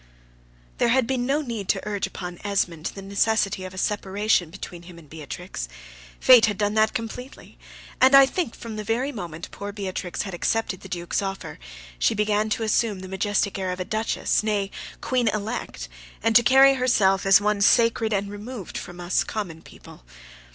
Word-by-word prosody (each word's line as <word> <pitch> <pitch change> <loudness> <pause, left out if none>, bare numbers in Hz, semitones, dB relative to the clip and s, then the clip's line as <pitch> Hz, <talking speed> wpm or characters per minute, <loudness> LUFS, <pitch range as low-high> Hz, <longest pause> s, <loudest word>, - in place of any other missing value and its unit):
There - - +3
had 255 +1 +3
been 250 0 -1
no 290 +3 +1
need 230 -7 -5
to - - 0
urge 205 -2 -1
upon 180 -1 -7
Esmond 180 -5 -1
the 195 - -8
necessity 200 -1 0
of 185 - -8
a - - -11
separation 200 -2 0
between 170 +1 -9
him 175 0 -13
and 165 -3 -15
Beatrix: 155 - -7 0.5
Fate 245 -3 +7
had 205 -2 -2
done 205 0 0
that 215 0 +2
completely; 250 +4 -7 0.4
and 260 +2 +7
I 275 0 +9
think 300 -2 -3
from 225 -2 -8
the 215 - -4
very 240 +7 -1
moment 170 - -7
poor 205 0 -6
Beatrix 190 -3 -4
had 195 - -7
accepted 190 +1 -1
the - - -11
Duke's 175 +1 -2
offer, 195 - -5 0.4
she - - +2
began 210 0 +1
to 225 - -1
assume 215 -2 +1
the 185 - -8
majestic 200 +1 -1
air 185 -1 -2
of 180 - -5
a 185 - -3
Duchess, 220 +3 0
nay, 205 -2 -1 0.3
Queen 250 -3 0
Elect, 210 - -3 0.4
and 225 0 +2
to 240 - +9
carry 270 +3 +6
herself 215 -7 +2
as 195 0 +6
one 210 0 0
sacred 230 +1 +3
and 200 -1 -1
removed 205 -1 -7
from 175 0 -10
us 175 +1 +1
common 180 -7 -5
people. - - -15
205 Hz, 185 wpm, -24 LUFS, 185-225 Hz, 0.5 s, I